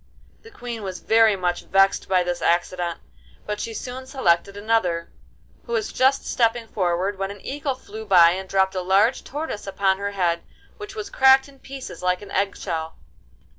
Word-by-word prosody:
The 455 - -14
Queen 245 - -7
was 190 -2 -5
very 225 -2 +4
much 180 -2 -2
vexed 195 +1 +2
by 185 -1 +3
this 175 0 -3
accident, 175 0 0 0.5
but 210 0 -4
she 230 - -4
soon 255 +3 -7
selected 200 -7 +1
another, 205 -6 0 0.6
who 470 - -4
was 425 -3 -1
just 265 +1 +2
stepping 230 -1 +1
forward 190 0 -1
when 195 0 -2
an 200 0 -10
eagle 280 -1 -3
flew 220 -3 -10
by 175 -4 +7
and 190 +1 -5
dropped 190 -1 +2
a 185 - -2
large 195 +7 +2
tortoise 290 -8 -5
upon 195 -1 +1
her 200 0 -3
head, 175 -3 0 0.4
which 415 -1 -9
was 420 -2 -6
cracked 265 0 +5
in 275 -1 -18
pieces 270 0 -9
like 180 +2 0
an 205 - -11
egg 200 0 0
shell. 160 -3 -4
200 Hz, 180 wpm, -23 LUFS, 185-255 Hz, 0.6 s, by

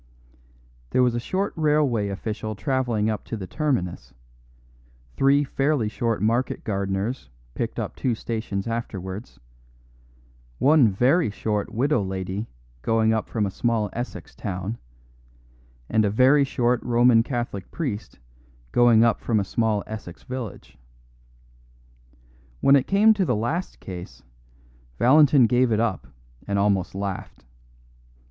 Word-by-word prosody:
There 130 - +3
was 125 -1 +2
a 120 - -1
short 190 +11 -2
railway 150 -9 +1
official 110 +2 -4
travelling 115 0 0
up 110 -3 -2
to 115 - -5
the 95 - -6
terminus, 90 - -2 1.0
three 140 +1 +4
fairly 135 -4 0
short 115 0 -2
market 120 +4 0
gardeners 100 - -2 0.2
picked - - -4
up - - -4
two 125 -3 -1
stations 110 -4 -4
afterwards, 105 -3 -5 1.2
one 145 -3 +5
very 125 - +2
short 105 0 -2
widow 130 +1 +1
lady 95 +2 -4 0.3
going 110 - +2
up 110 - -2
from 110 -3 0
a 95 - -3
small 110 -2 0
Essex 120 +2 -6
town, 100 +2 -5 1.1
and 110 0 +2
a 105 - +2
very 130 +7 +5
short 125 -2 0
Roman 120 -1 +4
Catholic 120 -6 -4
priest 125 -11 -5 0.5
going 120 -2 +5
up 115 -1 +2
from 110 -3 +1
a - - 0
small 110 0 0
Essex 105 -5 -8
village. 125 -6 -7 1.8
When 140 - +5
it 135 - +2
came 210 +3 +5
to 205 -3 0
the 125 -10 +1
last 145 - -3
case, 90 -2 -9 0.7
Valentin 140 - +6
gave 125 +1 +2
it 110 - +2
up 105 - -1 0.4
and 100 0 0
almost 100 -2 +1
laughed. 100 -9 -5
115 Hz, 130 wpm, -24 LUFS, 100-130 Hz, 1.8 s, Valentin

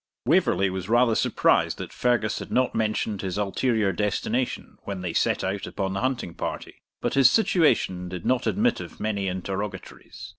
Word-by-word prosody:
Waverley 95 -1 +3
was 95 +1 -5
rather 120 0 +4
surprised - - +2
that - - -7
Fergus 120 -3 +1
had - - -8
not 130 -1 +2
mentioned 110 -2 -1
this 95 0 -3
ulterior 105 +1 +1
destination 110 +6 -2
when 100 -2 -5
they 90 -2 -3
set - - +1
out 95 +1 -2
upon 95 -1 -3
the 95 - -2
hunting 125 -9 -2
party; - - -6 0.2
but - - -1
his 135 -2 +6
situation 125 - +2
did 90 -2 -7
not 130 0 +1
admit 230 +4 +1
of - - -9
many 100 -3 -1
interrogatories. 95 +1 -6
105 Hz, 170 wpm, -25 LUFS, 95-125 Hz, 0.2 s, his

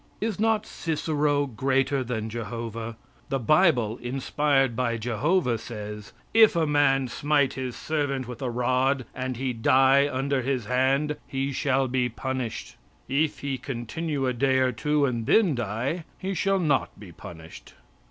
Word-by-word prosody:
Is 215 -2 -2
not 220 0 +2
Cicero 150 -3 0
greater 135 +2 0
than 115 -3 -3
Jehovah? 115 0 -5 0.3
The 135 - 0
bible, 125 - +3
inspired 135 +1 +1
by 120 -1 0
Jehovah, 125 - 0
says: 105 -2 -7 0.2
"If 220 -4 +6
a 165 -1 +2
man 145 -3 +3
smite 140 +2 +1
his 130 -2 -4
servant 145 -5 -2
with 125 0 -8
a 130 - -1
rod 130 +2 +1
and 130 -1 -4
he 130 0 -2
die 135 +4 +4
under 135 +1 0
his 130 -3 -1
hand 135 +5 +1
he 135 +1 -2
shall 135 0 +1
be 125 0 0
punished. 120 - -5 0.3
It 150 +3 +1
he 135 -2 -3
continue 135 +3 -3
a 125 - +1
day 130 +2 +2
or 130 -1 +3
two 150 +4 +1
and 120 -4 -2
then 205 -8 +4
die, 120 - -2
he 195 +1 -3
shall 195 +1 +1
not 150 - 0
be 100 -4 -11
punished." 80 -1 -12
130 Hz, 150 wpm, -26 LUFS, 120-145 Hz, 0.3 s, If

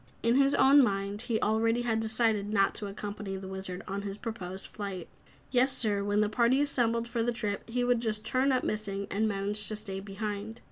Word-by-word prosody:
In 230 +1 +3
his 275 +2 +4
own 280 +2 +7
mind 200 -1 -1
he 235 -2 -1
already 225 +2 +2
had 225 -2 +1
decided 220 -2 +1
not 195 -2 +3
to 205 - -5
accompany 200 -1 -5
the 190 0 -7
Wizard 190 -1 -5
on 195 +1 -3
his 200 0 -5
proposed 195 -5 -6
flight. 195 -4 -6 0.4
Yessir, 245 -5 +2
when 205 +1 +2
the 210 - +3
party 235 +4 +3
assembled 235 -5 +1
for 235 -1 -2
the 240 +1 +1
trip 215 -2 -3
he 245 +1 0
would 245 -1 +3
just 215 -2 -2
turn 260 +4 +2
up 255 - +1
missing 200 -2 -2
and 215 +2 +1
manage 205 0 -1
to 215 - -1
stay 195 -2 -5
behind. 205 +2 -5
215 Hz, 200 wpm, -30 LUFS, 200-235 Hz, 0.4 s, own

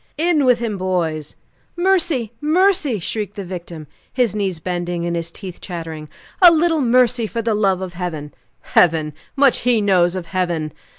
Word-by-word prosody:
"In 315 -3 +2
with 250 -2 +5
him, 225 -4 -3
boys!" 165 -5 -2 0.4
"Mercy! 345 - +1
Mercy!" 320 - +2
shrieked 205 +3 -4
the 200 -3 -6
victim, 170 -3 -8 0.3
his 250 -5 +1
knees 195 -5 -2
bending 175 0 -3
and 170 0 -1
his 170 0 -3
teeth 185 -1 -9
chattering 160 -4 -7 0.3
"a 360 - +10
little 325 -1 +2
mercy 245 -2 +3
for 230 +1 -4
the 225 0 +1
love 195 -3 +1
of 180 -1 -6
Heaven!" 165 -5 -5 0.3
"Heaven! 155 -3 +2 0.2
Much 275 -2 +4
he 245 -2 +2
knows 185 -3 +2
of 185 -2 -4
Heaven!" 170 -4 -2
195 Hz, 165 wpm, -19 LUFS, 175-250 Hz, 0.4 s, a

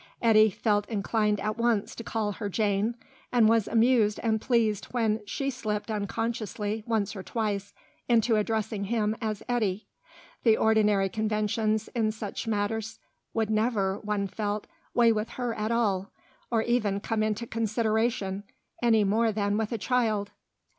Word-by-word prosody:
Eddy 220 -2 +6
felt 205 +1 0
inclined 210 -1 0
at 215 +3 -3
once 230 -3 +1
to 230 - -7
call 220 -2 -1
her 205 0 -4
Jane, 210 +2 0 0.4
and 235 -3 +5
was 225 -2 +3
amused 225 -2 +3
and 220 -2 +1
pleased 225 -5 +1
when 220 -3 0
she 275 +6 -2
slipped 215 -3 -3
unconsciously 215 0 -2
once 215 -2 0
or 195 - -5
twice 205 -1 -2 0.4
into 230 -1 +4
addressing 215 -1 -1
him 215 0 0
as 215 -3 -3
Eddy. 215 -5 0 0.6
The 225 -2 +4
ordinary 210 -3 +3
conventions 215 +1 0
in 225 -3 0
such 215 +1 -6
matters 220 +1 -1 0.4
would 220 -1 0
never, 215 -3 +1
one 210 -1 -1
felt, 205 +1 -3 0.3
weigh 235 -1 +6
with 215 +1 -1
her 245 -2 -1
at 215 0 -2
all, 200 -5 +1 0.4
or 225 -2 +1
even 215 -5 +1
come 215 +1 -1
into 215 +2 -1
consideration, 220 -2 0 0.4
any 225 -3 +4
more 220 +3 +2
than 205 -1 0
with 220 +1 -1
a 230 - -1
child. 220 -3 0
215 Hz, 150 wpm, -28 LUFS, 205-230 Hz, 0.6 s, Eddy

